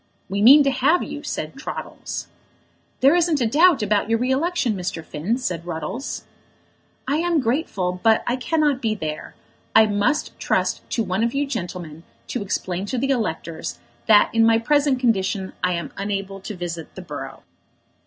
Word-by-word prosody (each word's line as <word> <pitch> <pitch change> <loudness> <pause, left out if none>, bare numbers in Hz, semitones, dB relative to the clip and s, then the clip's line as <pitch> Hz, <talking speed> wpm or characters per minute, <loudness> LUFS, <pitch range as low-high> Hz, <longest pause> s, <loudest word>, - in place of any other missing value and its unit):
"We 200 +1 -1
mean 280 +7 +9
to 275 - +2
have 275 +7 +2
you," - - -6
said - - -4
Troddles. - - -6 0.8
"There 275 +3 +6
isn't 340 -3 +2
a 245 - +2
doubt 300 +2 +4
about 210 +1 +1
your 230 - +3
re 250 +3 0
election, 280 -3 +1
Mr. 175 -4 -4
Finn," 175 +11 -2
said 180 -10 -3
Ruddles. 170 - -5 0.8
"I 285 +3 +1
am 345 +2 0
very 315 - +3
grateful, 200 - -1
but 220 -1 +4
I 245 - +1
cannot 290 0 +1
be 220 -2 0
there. 155 -5 -5 0.4
I 220 0 +8
must 210 +8 0
trust - - 0
to 230 - 0
one 190 +2 -1
of 235 +3 0
you 285 +1 +1
gentlemen 175 - -5 0.3
to 250 - -2
explain 190 -1 -3
to 255 - -2
the 270 +3 0
electors 165 -9 -3 0.3
that 210 -1 +5
in 230 0 +4
my 225 0 +5
present 285 +2 +2
condition 195 -5 0
I 180 0 +2
am 170 -3 -4
unable 195 -1 -3
to 200 +2 -7
visit 170 -2 -6
the 185 - -8
borough." 135 -5 -8
220 Hz, 175 wpm, -22 LUFS, 180-270 Hz, 0.8 s, mean